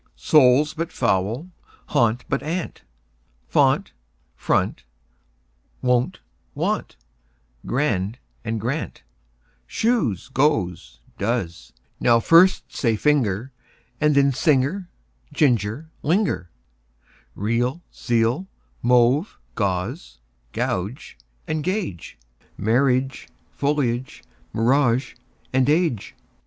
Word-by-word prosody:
Soul, 140 Hz, 0 st, +5 dB
but 165 Hz, +1 st, -3 dB
foul 110 Hz, +1 st, 0 dB
and 180 Hz, +2 st, -15 dB, 0.4 s
gaunt, 115 Hz, +1 st, +2 dB
but -, -, -1 dB
aunt; 165 Hz, +4 st, -4 dB, 0.7 s
Font, -, -, +2 dB, 0.4 s
front, -, -, 0 dB, 1.0 s
wont; 125 Hz, -1 st, +1 dB, 0.3 s
want, -, -, -2 dB, 0.7 s
grand, 115 Hz, -6 st, 0 dB, 0.3 s
and, 115 Hz, -1 st, -2 dB
grant, 130 Hz, +9 st, -4 dB, 0.6 s
Shoes, 220 Hz, -, 0 dB
goes, 95 Hz, -, 0 dB, 0.2 s
does.) 100 Hz, -6 st, -2 dB, 0.3 s
Now 115 Hz, -1 st, +4 dB
first 170 Hz, +9 st, +4 dB
say: 115 Hz, -4 st, +1 dB
finger, 125 Hz, -3 st, +1 dB, 0.5 s
And 150 Hz, -1 st, +3 dB
then: 140 Hz, -1 st, +4 dB
singer, 155 Hz, +6 st, +1 dB, 0.4 s
ginger, 125 Hz, +2 st, 0 dB
linger. 160 Hz, -, 0 dB, 0.9 s
Real, 120 Hz, -, -1 dB
zeal; 120 Hz, +9 st, 0 dB, 0.3 s
mauve, 125 Hz, -, +3 dB, 0.2 s
gauze 100 Hz, -, -3 dB, 1.3 s
and 155 Hz, -1 st, -2 dB
gauge; 175 Hz, -, -3 dB, 0.4 s
Marriage, 130 Hz, +4 st, +1 dB, 0.2 s
foliage, 130 Hz, -3 st, -1 dB, 0.3 s
mirage, 125 Hz, +2 st, +2 dB, 0.4 s
age. 135 Hz, -, +1 dB
125 Hz, 80 wpm, -23 LUFS, 115-150 Hz, 1.3 s, Soul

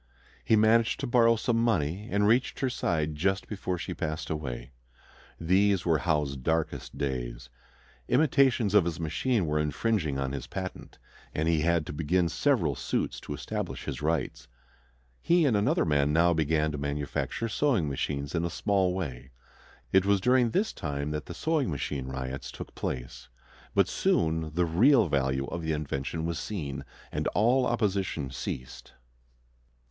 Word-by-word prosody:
He 110 Hz, -, +4 dB
managed 110 Hz, +1 st, +4 dB
to -, -, -1 dB
borrow 120 Hz, -2 st, +4 dB
some 115 Hz, +1 st, 0 dB
money, 100 Hz, -3 st, 0 dB
and 105 Hz, +1 st, +2 dB
reached 120 Hz, +4 st, +2 dB
her 130 Hz, -2 st, +1 dB
side 80 Hz, -9 st, -1 dB
just 95 Hz, +6 st, 0 dB
before 95 Hz, -3 st, -3 dB
she -, -, -4 dB
passed 80 Hz, 0 st, -4 dB
away. 65 Hz, -5 st, -4 dB, 0.7 s
These 95 Hz, +3 st, +2 dB
were 80 Hz, -3 st, +3 dB
Howe's 75 Hz, -4 st, 0 dB
darkest 80 Hz, +5 st, -2 dB
days. -, -, -4 dB, 0.6 s
Imitations 130 Hz, -6 st, +3 dB
of 105 Hz, -5 st, +5 dB
his 85 Hz, -1 st, -3 dB
machine 100 Hz, +6 st, 0 dB
were 75 Hz, 0 st, 0 dB
infringing 75 Hz, 0 st, 0 dB
on 65 Hz, -1 st, -2 dB
his 65 Hz, -3 st, -5 dB
patent, 95 Hz, +7 st, -6 dB, 0.4 s
and 80 Hz, +1 st, 0 dB
he 80 Hz, -2 st, +2 dB
had 85 Hz, -1 st, +2 dB
to -, -, -6 dB
begin 85 Hz, +4 st, +1 dB
several 105 Hz, -, +1 dB
suits -, -, -2 dB
to -, -, -6 dB
establish -, -, -4 dB
his -, -, -4 dB
rights. 80 Hz, +1 st, -1 dB, 0.7 s
He 170 Hz, -1 st, +3 dB
and 125 Hz, -6 st, +3 dB
another 100 Hz, 0 st, +2 dB
man 75 Hz, -2 st, +2 dB
now 85 Hz, +3 st, +4 dB
began 80 Hz, -1 st, +1 dB
to 75 Hz, -, -4 dB
manufacture 70 Hz, +10 st, -2 dB
sewing 115 Hz, -, +1 dB
machines 70 Hz, 0 st, -3 dB
in 85 Hz, -1 st, 0 dB
a 85 Hz, -, -1 dB
small 95 Hz, 0 st, +1 dB
way. 65 Hz, -8 st, -5 dB, 0.6 s
It 95 Hz, -1 st, +5 dB
was 100 Hz, 0 st, +3 dB
during 125 Hz, +3 st, +3 dB
this 205 Hz, -, 0 dB
time 70 Hz, -1 st, -3 dB
that 75 Hz, 0 st, -4 dB
the -, -, -7 dB
"sewing 155 Hz, -5 st, 0 dB
machine 70 Hz, -3 st, -3 dB
riots" 65 Hz, 0 st, -5 dB
took -, -, -9 dB
place; 60 Hz, 0 st, -5 dB, 0.5 s
but -, -, +4 dB
soon 80 Hz, -1 st, 0 dB
the 90 Hz, 0 st, +3 dB
real 110 Hz, -, +4 dB
value 65 Hz, -1 st, 0 dB
of 85 Hz, -, -5 dB
the 80 Hz, -1 st, -1 dB
invention 75 Hz, +2 st, -3 dB
was 85 Hz, 0 st, -2 dB
seen, 75 Hz, -11 st, -5 dB, 0.3 s
and -, -, -2 dB
all 125 Hz, +4 st, +3 dB
opposition 95 Hz, -, -1 dB
ceased. 65 Hz, -1 st, -6 dB
80 Hz, 160 wpm, -28 LUFS, 70-105 Hz, 0.7 s, of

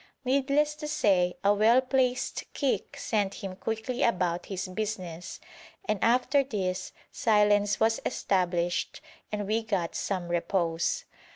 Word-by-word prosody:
Needless 280 Hz, +3 st, +2 dB
to 300 Hz, 0 st, -5 dB
say 195 Hz, -12 st, +2 dB
a 200 Hz, +1 st, +5 dB
well 220 Hz, +4 st, +5 dB
placed 255 Hz, -1 st, 0 dB
kick 275 Hz, -3 st, -1 dB
sent 205 Hz, -3 st, -1 dB
him 190 Hz, -2 st, -6 dB
quickly 225 Hz, +5 st, -3 dB
about 180 Hz, -5 st, +1 dB
his 190 Hz, -1 st, -4 dB
business, 185 Hz, -4 st, -5 dB, 0.5 s
and 215 Hz, -, 0 dB
after 250 Hz, +4 st, +3 dB
this 190 Hz, -7 st, -3 dB, 0.2 s
silence 210 Hz, -1 st, +3 dB
was 225 Hz, 0 st, +3 dB
established 175 Hz, -2 st, 0 dB, 0.3 s
and 210 Hz, -1 st, -2 dB
we 220 Hz, +3 st, +1 dB
got 195 Hz, -7 st, -2 dB
some 180 Hz, -3 st, -3 dB
repose. 170 Hz, -1 st, 0 dB
205 Hz, 125 wpm, -28 LUFS, 185-245 Hz, 0.5 s, a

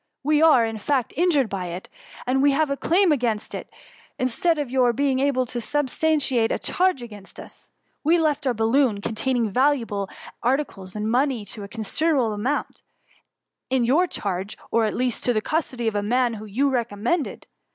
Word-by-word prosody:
We 300 Hz, +2 st, +3 dB
are, 300 Hz, -8 st, +6 dB
in 225 Hz, -1 st, -4 dB
fact, 260 Hz, +2 st, -1 dB
injured 315 Hz, -7 st, +3 dB
by 190 Hz, -3 st, -4 dB
it, 175 Hz, +2 st, -7 dB, 0.4 s
and 265 Hz, +2 st, +1 dB
we 285 Hz, 0 st, +4 dB
have 305 Hz, 0 st, +1 dB
a -, -, +1 dB
claim 355 Hz, +5 st, +3 dB
against 235 Hz, -6 st, -1 dB
you -, -, -5 dB, 0.5 s
instead 280 Hz, +6 st, +1 dB
of 285 Hz, -4 st, -3 dB
your 250 Hz, -2 st, +3 dB
being 270 Hz, +1 st, +1 dB
able 270 Hz, -2 st, +1 dB
to 240 Hz, 0 st, -4 dB
substantiate 285 Hz, -2 st, +1 dB
a -, -, +1 dB
charge 365 Hz, -8 st, 0 dB
against 210 Hz, -4 st, -11 dB
us. -, -, -13 dB, 0.3 s
We 325 Hz, +4 st, +4 dB
left 305 Hz, -3 st, 0 dB
our 250 Hz, -, +1 dB
balloon, 225 Hz, -1 st, +2 dB
containing 230 Hz, +1 st, -1 dB
valuable 230 Hz, -6 st, +1 dB, 0.3 s
ar 255 Hz, +3 st, +3 dB
ticles, 195 Hz, -10 st, -7 dB
and 210 Hz, 0 st, -3 dB
money 250 Hz, -1 st, +1 dB
to 210 Hz, +2 st, -9 dB
a 200 Hz, -, -7 dB
considerable 235 Hz, +3 st, 0 dB
amount, 245 Hz, +8 st, -2 dB, 0.9 s
in 260 Hz, -1 st, +2 dB
your 310 Hz, +10 st, +3 dB
charge, 195 Hz, -, -4 dB
or, 230 Hz, -1 st, +3 dB
at 215 Hz, -, -2 dB
least, 250 Hz, -1 st, 0 dB
in 245 Hz, -, +2 dB
the -, -, +3 dB
custody 255 Hz, -5 st, -2 dB
of 220 Hz, -, +1 dB
a 205 Hz, -, 0 dB
man 240 Hz, +3 st, +1 dB
whom 215 Hz, 0 st, -8 dB
you 270 Hz, +7 st, +1 dB
recommended. 240 Hz, -, -2 dB
250 Hz, 185 wpm, -23 LUFS, 220-285 Hz, 0.9 s, are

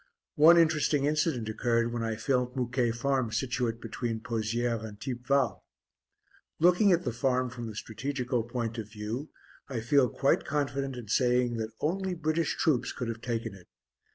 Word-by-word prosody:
One 165 Hz, +3 st, +7 dB
interesting 155 Hz, -3 st, +3 dB
incident 150 Hz, -6 st, 0 dB
occurred 115 Hz, +1 st, 0 dB
when 120 Hz, -, -2 dB
I 115 Hz, -1 st, -1 dB
filmed 125 Hz, +3 st, 0 dB
Mouquet 125 Hz, -1 st, 0 dB
Farm 125 Hz, 0 st, 0 dB
situate 120 Hz, -2 st, -1 dB
between 115 Hz, 0 st, -3 dB
Pozières 115 Hz, 0 st, -1 dB
and 105 Hz, -2 st, -8 dB
Thiepval. 130 Hz, +1 st, 0 dB, 1.0 s
Looking 180 Hz, +5 st, +5 dB
at 175 Hz, 0 st, +3 dB
the 120 Hz, -, -2 dB
Farm 125 Hz, 0 st, 0 dB
from 120 Hz, -1 st, -6 dB
the 110 Hz, -, -7 dB
strategical 125 Hz, +2 st, -2 dB
point 115 Hz, 0 st, -4 dB
of 105 Hz, -2 st, -6 dB
view, 110 Hz, +7 st, -5 dB, 0.4 s
I 130 Hz, -4 st, -2 dB
feel 130 Hz, +2 st, +3 dB
quite 140 Hz, -, +2 dB
confident 140 Hz, -2 st, -2 dB
in 120 Hz, -3 st, -8 dB
saying 125 Hz, 0 st, +2 dB
that 110 Hz, 0 st, -4 dB
only 185 Hz, +4 st, -1 dB
British 160 Hz, 0 st, 0 dB
troops 145 Hz, -7 st, +1 dB
could 120 Hz, -, -4 dB
have 115 Hz, 0 st, -5 dB
taken 115 Hz, -3 st, -3 dB
it. 95 Hz, -2 st, -15 dB
125 Hz, 160 wpm, -29 LUFS, 115-140 Hz, 1.0 s, One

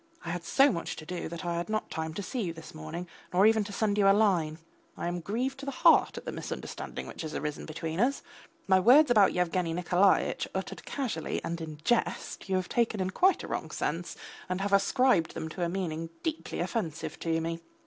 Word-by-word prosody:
I 170 Hz, -, -2 dB
had 175 Hz, 0 st, -4 dB
so 275 Hz, +10 st, +5 dB
much 170 Hz, -, -3 dB
to 155 Hz, -, -9 dB
do 175 Hz, 0 st, -4 dB
that 170 Hz, +1 st, -6 dB
I 170 Hz, -1 st, -1 dB
had 170 Hz, +4 st, -3 dB
not 215 Hz, 0 st, -2 dB
time 160 Hz, 0 st, -3 dB
to 200 Hz, -, -3 dB
see 245 Hz, +6 st, -3 dB
you 175 Hz, -5 st, -2 dB
this 160 Hz, -1 st, -11 dB
morning, 155 Hz, +3 st, -6 dB, 0.2 s
nor 185 Hz, +3 st, +4 dB
even 220 Hz, -1 st, +5 dB
to 205 Hz, -, -7 dB
send 205 Hz, 0 st, 0 dB
you 195 Hz, -1 st, +6 dB
a -, -, +7 dB
line. 175 Hz, -8 st, +2 dB, 0.4 s
I -, -, -4 dB
am 175 Hz, 0 st, -2 dB
grieved 245 Hz, +10 st, -2 dB
to 280 Hz, -, -7 dB
the -, -, -1 dB
heart 330 Hz, +5 st, +5 dB
at -, -, -7 dB
the -, -, -3 dB
misunderstanding -, -, -6 dB
which -, -, -8 dB
has 155 Hz, -2 st, -5 dB
arisen 150 Hz, -1 st, -4 dB
between 160 Hz, +1 st, -4 dB
us. 265 Hz, +5 st, +1 dB, 0.4 s
My 190 Hz, -1 st, +5 dB
words 255 Hz, +8 st, +7 dB
about 210 Hz, -5 st, +6 dB
Yevgeny 180 Hz, -1 st, 0 dB
Nikolaitch 180 Hz, +3 st, +2 dB
uttered -, -, -4 dB
casually 240 Hz, -, -2 dB
and 170 Hz, 0 st, -3 dB
in 155 Hz, -2 st, -6 dB
jest 240 Hz, -4 st, -1 dB
you 190 Hz, -, +2 dB
have 185 Hz, -1 st, 0 dB
taken 230 Hz, -3 st, +1 dB
in 185 Hz, 0 st, -1 dB
quite 375 Hz, -, +3 dB
a -, -, -6 dB
wrong -, -, -3 dB
sense, -, -, -3 dB, 0.3 s
and 185 Hz, 0 st, -1 dB
have 200 Hz, 0 st, -1 dB
ascribed 200 Hz, -2 st, +3 dB
to -, -, -3 dB
them 160 Hz, -1 st, -5 dB
a 175 Hz, -2 st, 0 dB
meaning 165 Hz, -3 st, -3 dB
deeply 320 Hz, 0 st, -3 dB
offensive 170 Hz, -9 st, -3 dB
to 165 Hz, -1 st, 0 dB
me. 165 Hz, +1 st, -3 dB
180 Hz, 220 wpm, -29 LUFS, 165-220 Hz, 0.4 s, a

